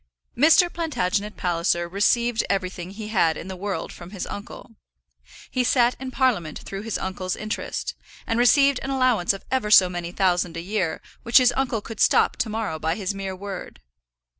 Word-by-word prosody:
Mr. 320 Hz, +7 st, +6 dB
Plantagenet 210 Hz, -, -2 dB
Palliser 175 Hz, -1 st, 0 dB
received 230 Hz, +5 st, +1 dB
everything 185 Hz, -2 st, -2 dB
he 210 Hz, +2 st, -8 dB
had 165 Hz, -7 st, +2 dB
in 170 Hz, -, -8 dB
the 190 Hz, -, -5 dB
world 200 Hz, +2 st, -4 dB
from 175 Hz, 0 st, -11 dB
his 195 Hz, -2 st, -5 dB
uncle. 205 Hz, +3 st, -9 dB, 0.8 s
He 255 Hz, -, +1 dB
sat 245 Hz, 0 st, +3 dB
in 265 Hz, 0 st, -5 dB
Parliament 235 Hz, -, 0 dB
through 195 Hz, 0 st, -7 dB
his 225 Hz, 0 st, -3 dB
uncle's 185 Hz, -1 st, -3 dB
interest, 215 Hz, +1 st, -4 dB, 0.3 s
and 230 Hz, +1 st, -1 dB
received 275 Hz, +2 st, +5 dB
an 265 Hz, -, -5 dB
allowance 255 Hz, -9 st, +2 dB
of 195 Hz, -, -7 dB
ever 260 Hz, -5 st, 0 dB
so 190 Hz, -3 st, +7 dB
many 175 Hz, -1 st, -5 dB
thousand 180 Hz, -3 st, 0 dB
a -, -, -3 dB
year 185 Hz, -3 st, -2 dB, 0.2 s
which 235 Hz, -, +4 dB
his 250 Hz, -2 st, +5 dB
uncle 260 Hz, -5 st, -1 dB
could 225 Hz, 0 st, -9 dB
stop -, -, +4 dB
to 225 Hz, -, -1 dB
morrow 215 Hz, -7 st, -3 dB
by 160 Hz, +2 st, -1 dB
his 200 Hz, -1 st, -3 dB
mere 195 Hz, -1 st, -5 dB
word. 195 Hz, -1 st, -8 dB
205 Hz, 180 wpm, -24 LUFS, 180-240 Hz, 0.8 s, so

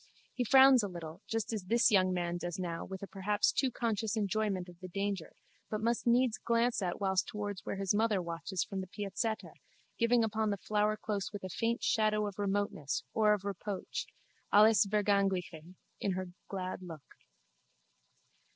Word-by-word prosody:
He 250 Hz, -, -1 dB
frowns 265 Hz, +1 st, +7 dB
a 205 Hz, -, -2 dB
little 170 Hz, -1 st, -8 dB
just 225 Hz, 0 st, -2 dB
as 205 Hz, -4 st, -3 dB
this 230 Hz, +4 st, +4 dB
young 185 Hz, -2 st, +4 dB
man 175 Hz, -1 st, -1 dB
does 175 Hz, -1 st, -4 dB
now 170 Hz, -3 st, -3 dB
with 190 Hz, 0 st, -7 dB
a -, -, -5 dB
perhaps 205 Hz, +2 st, +1 dB
too 265 Hz, -, +1 dB
conscious 225 Hz, -3 st, -1 dB
enjoyment 200 Hz, -3 st, 0 dB
of 175 Hz, -1 st, -14 dB
the 185 Hz, -, -7 dB
danger 195 Hz, -1 st, -3 dB, 0.3 s
but 215 Hz, -, -2 dB
must 235 Hz, +2 st, 0 dB
needs 240 Hz, -1 st, +3 dB
glance 235 Hz, -1 st, +1 dB
at 180 Hz, -2 st, -2 dB
whiles 190 Hz, -2 st, +2 dB
towards 205 Hz, -2 st, -5 dB
where -, -, -3 dB
his 195 Hz, 0 st, 0 dB
mother 215 Hz, -1 st, +2 dB
watches 170 Hz, +1 st, -3 dB
from 195 Hz, -1 st, -4 dB
the 185 Hz, -, -7 dB
piazzetta 205 Hz, +3 st, -3 dB, 0.5 s
giving 235 Hz, 0 st, +4 dB
upon 220 Hz, 0 st, 0 dB
the 200 Hz, -, -1 dB
flowerclose 210 Hz, 0 st, -1 dB
with 205 Hz, -2 st, -7 dB
a 185 Hz, -, -4 dB
faint 230 Hz, +5 st, -1 dB
shadow 215 Hz, -1 st, +2 dB
of 205 Hz, -1 st, -6 dB
remoteness 200 Hz, -8 st, -1 dB
or 215 Hz, -1 st, +4 dB
of 200 Hz, -1 st, -9 dB
reproach 200 Hz, 0 st, -4 dB, 0.4 s
(alles 215 Hz, 0 st, +6 dB
Vergängliche) 195 Hz, -5 st, 0 dB, 0.2 s
in 195 Hz, -, 0 dB
her 185 Hz, 0 st, -4 dB, 0.2 s
glad 185 Hz, -1 st, -4 dB
look. 165 Hz, -6 st, -9 dB
205 Hz, 170 wpm, -32 LUFS, 185-220 Hz, 0.5 s, frowns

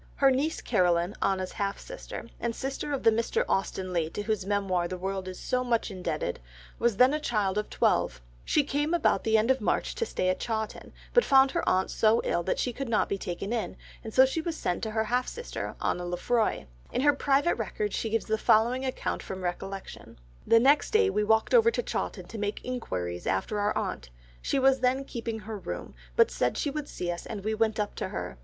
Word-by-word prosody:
Her 275 Hz, -1 st, +5 dB
niece 285 Hz, +5 st, 0 dB
Caroline, 175 Hz, +1 st, +2 dB
Anna's 190 Hz, -1 st, 0 dB
half 200 Hz, 0 st, -2 dB
sister, -, -, -8 dB
and 235 Hz, -1 st, -2 dB
sister 270 Hz, +2 st, -4 dB
of 275 Hz, -, -2 dB
the 225 Hz, -, +6 dB
Mr. 225 Hz, +1 st, 0 dB
Austen 190 Hz, -1 st, -1 dB
Leigh 165 Hz, -2 st, 0 dB
to 205 Hz, -, -4 dB
whose 210 Hz, -3 st, -1 dB
Memoir 195 Hz, -4 st, +1 dB
the 185 Hz, -, -5 dB
world 190 Hz, +1 st, -3 dB
is 185 Hz, -1 st, -7 dB
so 250 Hz, 0 st, 0 dB
much 235 Hz, -3 st, 0 dB
indebted, 185 Hz, -2 st, -3 dB, 0.4 s
was 235 Hz, -4 st, +2 dB
then 255 Hz, +4 st, +6 dB
a 305 Hz, -, 0 dB
child 210 Hz, -9 st, 0 dB
of 210 Hz, -, -4 dB
twelve; -, -, +1 dB, 0.2 s
she 300 Hz, -, +2 dB
came 295 Hz, +4 st, 0 dB
about 340 Hz, -, +2 dB
the 220 Hz, 0 st, +3 dB
end 220 Hz, +4 st, +3 dB
of 265 Hz, -2 st, +1 dB
March -, -, 0 dB
to 460 Hz, -, -1 dB
stay 185 Hz, -, 0 dB
at 185 Hz, -, 0 dB
Chawton, 220 Hz, -2 st, -4 dB, 0.2 s
but 485 Hz, -, +6 dB
found 270 Hz, -1 st, +5 dB
her 345 Hz, -, 0 dB
aunt 185 Hz, +1 st, +1 dB
so 225 Hz, +1 st, +3 dB
ill 175 Hz, -, 0 dB
that 180 Hz, -, -1 dB
she 250 Hz, -, -1 dB
could 270 Hz, +1 st, -4 dB
not 220 Hz, -, +2 dB
be 200 Hz, -, -1 dB
taken 190 Hz, +5 st, -4 dB
in, 230 Hz, -, -3 dB, 0.3 s
so 260 Hz, +4 st, +6 dB
she 265 Hz, +5 st, -1 dB
was 320 Hz, -1 st, -3 dB
sent 175 Hz, -, -1 dB
on -, -, -10 dB
to 220 Hz, -, -3 dB
her 220 Hz, -, +2 dB
half 245 Hz, +3 st, 0 dB
sister 475 Hz, +1 st, -5 dB
Anna 180 Hz, -, -1 dB
Lefroy; 180 Hz, -, 0 dB, 0.3 s
in -, -, 0 dB
her 290 Hz, +1 st, +5 dB
private 280 Hz, +4 st, +2 dB
records 420 Hz, -1 st, -3 dB
she 225 Hz, -, -1 dB
gives 225 Hz, 0 st, 0 dB
the 220 Hz, 0 st, 0 dB
following 235 Hz, +5 st, +3 dB
account 260 Hz, -1 st, -2 dB
from 190 Hz, -1 st, -6 dB
recollection: 195 Hz, +2 st, -6 dB, 0.3 s
"The 230 Hz, -, +7 dB
next 280 Hz, +5 st, +4 dB
day 435 Hz, -3 st, +3 dB
we 210 Hz, -, +1 dB
walked 220 Hz, -, +2 dB
over 460 Hz, -2 st, +7 dB
to -, -, -2 dB
Chawton -, -, -3 dB
to 225 Hz, -, -8 dB
make 205 Hz, 0 st, -3 dB
enquiries 90 Hz, -, -4 dB
after 95 Hz, -, 0 dB
our 205 Hz, +1 st, +1 dB
aunt, 60 Hz, -, -3 dB, 0.3 s
she -, -, 0 dB
was 270 Hz, 0 st, +4 dB
then 260 Hz, +2 st, +1 dB
keeping 230 Hz, -4 st, -5 dB
her 215 Hz, 0 st, -6 dB
room, 90 Hz, -, -6 dB, 0.2 s
but -, -, +5 dB
said 125 Hz, -, 0 dB
she 290 Hz, -, -1 dB
would 295 Hz, 0 st, -4 dB
see 175 Hz, -1 st, -3 dB
us 175 Hz, -, -6 dB
and 210 Hz, -3 st, -6 dB
we 215 Hz, +1 st, 0 dB
went 220 Hz, 0 st, +1 dB
up 205 Hz, -1 st, -1 dB
to -, -, -2 dB
her. 60 Hz, 0 st, -5 dB
220 Hz, 225 wpm, -28 LUFS, 190-265 Hz, 0.4 s, The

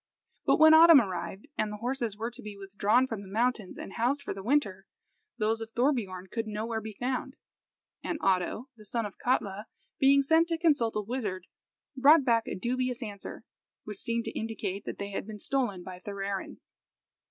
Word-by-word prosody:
But -, -, +5 dB
when 315 Hz, 0 st, +8 dB
autumn 325 Hz, -1 st, +9 dB
arrived, 190 Hz, -, -4 dB
and 215 Hz, -1 st, 0 dB
the 210 Hz, -, -5 dB
horses 235 Hz, -2 st, -3 dB
were 230 Hz, +2 st, -3 dB
to -, -, -10 dB
be 210 Hz, -1 st, -8 dB
withdrawn 200 Hz, +5 st, +2 dB
from 225 Hz, -5 st, -5 dB
the 200 Hz, -, -11 dB
mountains 220 Hz, 0 st, -1 dB
and -, -, -8 dB
housed 255 Hz, +5 st, 0 dB
for -, -, -3 dB
the 195 Hz, -, -7 dB
winter, 200 Hz, -6 st, 0 dB, 0.5 s
those 225 Hz, 0 st, 0 dB
of 225 Hz, -, -6 dB
Thorbiorn 215 Hz, -9 st, 0 dB
could 225 Hz, -1 st, -3 dB
nowhere 220 Hz, +1 st, -3 dB
be 215 Hz, -1 st, -8 dB
found, 260 Hz, +2 st, -2 dB, 0.7 s
and 335 Hz, -, -2 dB
Oddo, 195 Hz, +6 st, 0 dB
the 215 Hz, -, -15 dB
son 230 Hz, +2 st, -2 dB
of 205 Hz, -, -9 dB
Katla, 210 Hz, -4 st, -1 dB, 0.3 s
being 275 Hz, +1 st, +5 dB
sent 320 Hz, +4 st, +4 dB
to 335 Hz, -1 st, -1 dB
consult 295 Hz, -9 st, +2 dB
a 210 Hz, -, +1 dB
wizard, 205 Hz, -5 st, -4 dB, 0.5 s
brought 280 Hz, +2 st, +6 dB
back 230 Hz, -3 st, +2 dB
a -, -, -3 dB
dubious 250 Hz, +4 st, -2 dB
answer, 205 Hz, -3 st, -8 dB, 0.4 s
which 210 Hz, -2 st, -7 dB
seemed 235 Hz, -1 st, -1 dB
to -, -, -3 dB
indicate 210 Hz, -3 st, -4 dB
that -, -, -5 dB
they 200 Hz, 0 st, -5 dB
had 195 Hz, -, -4 dB
been 215 Hz, -1 st, -7 dB
stolen 210 Hz, -6 st, -1 dB
by 180 Hz, 0 st, -9 dB
Thorarin. 200 Hz, 0 st, -5 dB
225 Hz, 185 wpm, -29 LUFS, 200-255 Hz, 0.7 s, autumn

